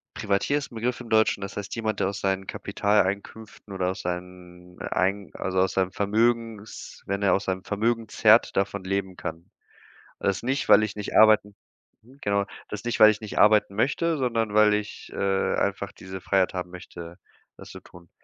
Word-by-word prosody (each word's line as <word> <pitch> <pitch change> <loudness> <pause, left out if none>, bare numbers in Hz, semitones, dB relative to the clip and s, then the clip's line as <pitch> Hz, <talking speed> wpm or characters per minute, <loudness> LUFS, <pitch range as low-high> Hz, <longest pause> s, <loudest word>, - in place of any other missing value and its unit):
Privatier 105 +7 0
ist 140 - -8
'n - - -12
Begriff 120 +2 -2
im 115 - -10
Deutschen. 110 -2 +3
Das 100 +1 -7
heißt 100 0 -5
jemand, 110 -3 -2
der - - +1
aus 100 0 -5
seinen 95 0 -1
Kapitaleinkünften 100 +1 -2
oder 90 -1 -1
aus 95 - -7
seinen 90 0 -8
ein 95 0 -1
also, 95 0 -2
aus 95 0 +2
seinem 95 -1 0
Vermögens 110 +1 -1
wenn 100 +1 -2
er 100 - +3
aus 95 - +1
seinem 95 0 -3
Vermögen 115 +2 -1
zerrt, 110 +1 +4
davon 100 0 -1
leben 95 -1 -2
kann. 85 +1 -7 0.7
Das 100 +3 -1
nicht, 135 +3 -1
weil 105 0 +7
ich 105 -1 -4
nicht 105 - -5
arbeiten 110 -2 +5 0.7
genau. 100 0 +1 0.2
Das 105 0 -6
ist - - -19
nicht, 120 - -2
weil 110 0 +9
ich 105 0 -1
nicht 110 - -5
arbeiten 105 -2 +5
möchte, 155 +8 0
sondern 115 -5 -1
weil 105 0 +5
ich, 105 0 -4
äh, 95 -1 0
einfach 100 0 -2
diese 95 0 -9
Freiheit 95 0 +1
haben 90 -1 -5
möchte, 85 -1 -10 0.4
das - - -13
zu - - -10
tun. 85 -1 -17
100 Hz, 190 wpm, -25 LUFS, 95-110 Hz, 0.7 s, weil